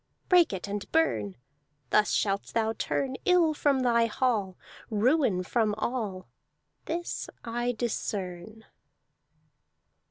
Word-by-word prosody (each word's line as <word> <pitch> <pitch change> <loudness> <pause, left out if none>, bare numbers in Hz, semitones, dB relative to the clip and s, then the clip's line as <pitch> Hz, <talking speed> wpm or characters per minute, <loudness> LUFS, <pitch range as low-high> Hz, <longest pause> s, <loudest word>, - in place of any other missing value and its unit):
Break 355 -2 +5
it 190 0 -4
and 200 0 -5
burn! 110 - +1 0.6
Thus 210 0 +4
shalt 200 -1 0
thou 225 -1 +1
turn 265 +3 -2
Ill 350 -3 +4
from 285 -3 +2
thy 235 -2 +3
hall, 215 -6 0 0.3
Ruin 225 - +2
from 215 +1 +1
all. 210 -5 -3 0.6
This 345 +1 -4
I 240 +1 -1
discern." 215 -2 -4
225 Hz, 105 wpm, -28 LUFS, 200-260 Hz, 0.6 s, Break